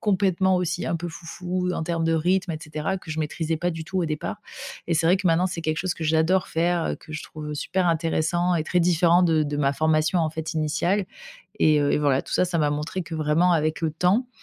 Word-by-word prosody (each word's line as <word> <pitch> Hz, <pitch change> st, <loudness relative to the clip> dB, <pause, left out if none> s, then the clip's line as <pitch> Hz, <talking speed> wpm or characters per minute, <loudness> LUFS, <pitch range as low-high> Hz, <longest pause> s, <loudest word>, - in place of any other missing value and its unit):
complètement, 190 Hz, -2 st, +2 dB
aussi, 180 Hz, 0 st, -1 dB
un 170 Hz, -, -1 dB
peu 170 Hz, +1 st, -3 dB
foufou, 180 Hz, +2 st, -4 dB
en -, -, -2 dB
termes 165 Hz, 0 st, -1 dB
de 165 Hz, -, +2 dB
rythme, 180 Hz, +2 st, +1 dB
et 155 Hz, -, -4 dB
cetera, 155 Hz, +5 st, -3 dB
que 160 Hz, -, -11 dB
je 155 Hz, -, -4 dB
maîtrisais 160 Hz, +1 st, -2 dB
pas 175 Hz, +3 st, -1 dB
du 165 Hz, 0 st, -6 dB
tout, 190 Hz, +3 st, -3 dB
au 175 Hz, -, +1 dB
départ. 155 Hz, -2 st, -3 dB, 0.5 s
Et 170 Hz, -, 0 dB
c'est 165 Hz, +1 st, +2 dB
vrai 180 Hz, -, +5 dB
que, 185 Hz, -, -3 dB
maintenant, 175 Hz, +2 st, +3 dB
c'est 175 Hz, -2 st, -5 dB
quelque 155 Hz, -1 st, -1 dB
chose 185 Hz, +1 st, -1 dB
que 165 Hz, -, -6 dB
j'adore 160 Hz, +4 st, +2 dB
faire, 170 Hz, +1 st, 0 dB
que 155 Hz, -, -12 dB
je 155 Hz, -, -4 dB
trouve 150 Hz, -1 st, -7 dB
super 180 Hz, +4 st, 0 dB
intéressant 170 Hz, +2 st, +1 dB
et 160 Hz, -, +1 dB
très 180 Hz, +3 st, 0 dB
différent 175 Hz, 0 st, +4 dB
de 160 Hz, -2 st, +3 dB
de 145 Hz, -1 st, -2 dB
ma 140 Hz, -1 st, +2 dB
formation, 155 Hz, +3 st, +2 dB
en 160 Hz, -, 0 dB
fait, 160 Hz, +1 st, -5 dB
initiale. 170 Hz, +6 st, 0 dB, 0.6 s
Et 155 Hz, -1 st, +5 dB
heu 145 Hz, 0 st, +2 dB
et -, -, +2 dB
voilà, 140 Hz, -3 st, +2 dB
tout -, -, -9 dB
ça, -, -, +3 dB
ça 175 Hz, -2 st, -1 dB
m'a 150 Hz, -1 st, +2 dB
montré 150 Hz, +5 st, -3 dB
que 165 Hz, -1 st, -6 dB
vraiment 155 Hz, +3 st, +2 dB
avec 155 Hz, -2 st, +1 dB
le 160 Hz, -1 st, 0 dB
temps, 180 Hz, +10 st, +1 dB
165 Hz, 245 wpm, -24 LUFS, 155-180 Hz, 0.6 s, vrai